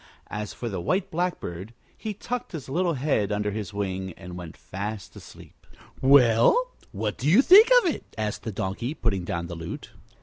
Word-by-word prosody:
As 105 -1 -4
for 120 - -6
the 95 -5 -3
White 185 - 0
Blackbird, 120 - -3 0.2
he 215 -2 -5
tucked 245 +1 -5
his 155 -5 -6
little 170 +4 0
head 125 -7 0
under 105 0 -1
his 105 -3 -5
wing 95 -2 -3
and 90 +2 -10
went 90 -2 -9
fast 100 +2 -6
asleep. - - -14 0.3
"Well, 135 - +5 0.2
what 105 -1 -3
do 135 +5 +1
you 205 - +6
think 410 - +8
of 340 - +2
it?" - - -12
asked 105 -1 -2
the 110 - -4
Donkey, 105 +7 -3
putting 100 - -1
down 85 -1 -3
the 85 - -7
lute. 85 - -7
110 Hz, 180 wpm, -26 LUFS, 95-155 Hz, 0.3 s, think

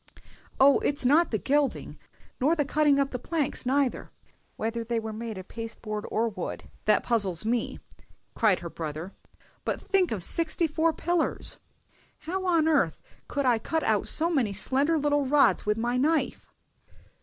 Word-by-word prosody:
"Oh, 275 +1 +6
it's 285 -2 -1
not 310 +7 +4
the 220 - 0
gilding, 280 +5 -1 0.4
nor 295 +6 +3
the 295 -3 0
cutting 290 0 +3
up 275 0 0
the 250 - -4
planks 300 -5 -2
neither, 270 -1 0 0.5
whether 230 +1 -3
they 235 +1 -2
be 220 -1 -3
made 220 -1 -6
of 185 - -9
pasteboard 225 -2 -6
or 230 +2 0
wood, 215 - -5 0.2
that - - +3
puzzles 200 -6 +1
me!" 235 +1 -1 0.6
cried 215 -5 +2
her 170 - -6
brother; 160 +3 -6 0.5
"but - - -2
think 385 -3 +1
of 200 -6 -3
sixty 330 - +2
four 320 +1 +1
pillars! 345 +1 -1 0.6
How 370 +4 -3
on 330 -3 +3
earth 280 - +2 0.3
could 280 -1 -2
I 240 -3 +3
cut 320 +7 -2
out - - +1
so 330 +2 +3
many 245 -11 +1
slender 275 +10 +1
little 290 -2 +1
rods 285 -5 +3
with 210 +1 +1
my 240 +2 -1
knife!" 310 +5 0
265 Hz, 165 wpm, -27 LUFS, 225-310 Hz, 0.6 s, Oh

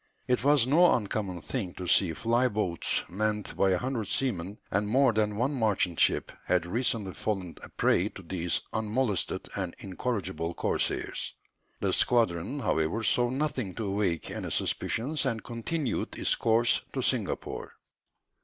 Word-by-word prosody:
It 125 -1 +1
was 145 -3 +5
no 170 +7 +5
uncommon 100 -5 -3
thing 105 -9 -4
to 90 - -6
see 90 0 +4
fly 120 +2 +2
boats 100 -7 0
manned 105 +2 -2
by 95 - +3
a 95 - +3
hundred 120 0 -2
seamen, 100 -6 0
and 100 +2 +1
more 130 +1 +4
than 105 -1 +1
one 130 +6 +1
merchant 105 - +1
ship - - +3
had 90 -2 +1
recently 110 -1 0
fallen 95 -6 -3
a - - -9
prey 95 +4 +2
to 95 - -12
these 85 0 -1
unmolested 110 -3 0
and 95 -3 -3
incorrigible 95 -4 -3
corsairs. - - -1 0.5
The - - +1
squadron, 115 - +2
however, 80 +3 0
saw 120 +2 +4
nothing 130 - -2
to 110 - -3
awake 95 -4 -1
any - - -4
suspicions, 145 +7 -1
and 115 -4 -2
continued 125 +5 -3
its - - +2
course 115 +1 +3
to - - -2
Singapore. - - -2
110 Hz, 150 wpm, -29 LUFS, 95-125 Hz, 0.5 s, was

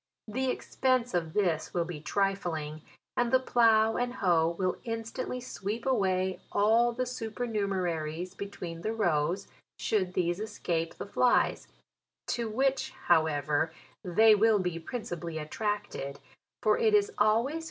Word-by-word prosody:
The 260 +5 -1
ex - - -5
pense 255 -3 +2
of 165 -3 -1
this 175 -7 0
will 170 -1 +1
be 165 -3 -7
trifling, 175 -4 -1 0.3
and 240 -1 +1
the 260 - +5
plough 225 -3 +4
and 245 0 -1
faoe 170 -4 +3
will 185 -1 0
instantly 230 +2 -4
sweep 225 -2 -5
away 190 -7 +1
all 225 +4 +4
the 255 +2 -2
su 240 -3 -4
pernumeraries 185 -7 -2
between 175 -4 -6
the 220 +5 -2
rows, 175 -2 0 0.3
should 185 -4 0
these 175 +1 0
escape 170 -6 -2
the - - -6
flies; 245 +4 +2 0.6
to 235 -2 -1
which, 265 +3 +1 0.2
however, 155 -2 +2 0.3
they 215 +5 +6
will 215 +1 +4
be 180 -3 -2
principally 170 -5 -5
attracted, 205 -3 -3 0.4
for - - +3
it 440 -2 +4
is 415 +1 +3
always - - -14
160 220 +5 +3
JULY. 325 - -3
200 Hz, 145 wpm, -30 LUFS, 170-235 Hz, 0.6 s, they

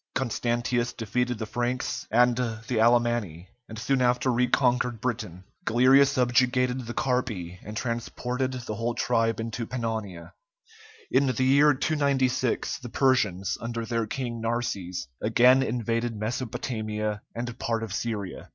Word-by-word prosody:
Constantius 120 0 0
defeated 125 +2 -1
the 110 - -4
Franks 120 +3 -2
and 120 +2 +4
the 115 -1 -2
Alemanni, 115 -7 +2 0.2
and 110 - -8
soon 130 +4 0
after 125 +1 +2
reconquered 125 -1 +2
Britain. 105 -7 -4 0.2
Galerius 130 +4 +5
subjugated 125 0 +2
the 120 - -5
Carpi, 110 -9 -2
and 105 +1 -7
transported 125 +2 -2
the 110 - -3
whole 115 +2 -2
tribe 115 -2 +1
into 115 0 -4
Pannonia. 110 -8 -4 0.8
In 140 - +3
the 130 0 0
year 140 +2 +5
296, 130 -4 0
the 125 - -8
Persians, 110 -9 +1
under 115 0 -3
their 115 -1 -1
king 120 -2 -4
Narses, 100 -7 -2
again 125 +4 +5
invaded 115 -1 -1
Mesopotamia 110 -2 -3
and 120 0 -5
part 115 -1 -1
of 110 -4 -5
Syria. 105 -4 -4
120 Hz, 130 wpm, -27 LUFS, 110-125 Hz, 0.8 s, Galerius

